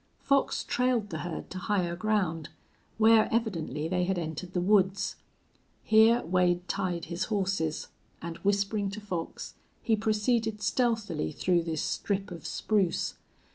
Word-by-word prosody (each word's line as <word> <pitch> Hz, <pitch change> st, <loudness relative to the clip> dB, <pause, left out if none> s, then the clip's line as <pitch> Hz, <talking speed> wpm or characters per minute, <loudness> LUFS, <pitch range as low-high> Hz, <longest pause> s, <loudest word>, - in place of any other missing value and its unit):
Fox 275 Hz, 0 st, +2 dB
trailed 245 Hz, -5 st, 0 dB
the 160 Hz, -, -3 dB
herd 175 Hz, 0 st, -6 dB
to 185 Hz, -, -5 dB
higher 180 Hz, -3 st, 0 dB
ground, 180 Hz, -5 st, -1 dB, 0.5 s
where 220 Hz, 0 st, +5 dB
evidently 165 Hz, -, -1 dB
they 180 Hz, +1 st, 0 dB
had 190 Hz, 0 st, 0 dB
entered 170 Hz, +2 st, -5 dB
the 180 Hz, -, +1 dB
woods. 190 Hz, 0 st, +2 dB, 0.7 s
Here 220 Hz, +2 st, +5 dB
Wade 180 Hz, 0 st, +1 dB
tied 180 Hz, -4 st, -2 dB
his 170 Hz, +3 st, -3 dB
horses, 195 Hz, -7 st, -1 dB, 0.3 s
and, 170 Hz, 0 st, -6 dB
whispering 200 Hz, 0 st, 0 dB
to 200 Hz, +2 st, -6 dB
Fox, 180 Hz, -6 st, -5 dB, 0.3 s
he 225 Hz, -, +3 dB
proceeded 220 Hz, 0 st, 0 dB
stealthily 220 Hz, -, 0 dB
through 180 Hz, -2 st, +1 dB
this 160 Hz, -2 st, -2 dB
strip 195 Hz, -1 st, -2 dB
of 170 Hz, -4 st, -7 dB
spruce. 200 Hz, -5 st, 0 dB
195 Hz, 135 wpm, -29 LUFS, 175-215 Hz, 0.7 s, where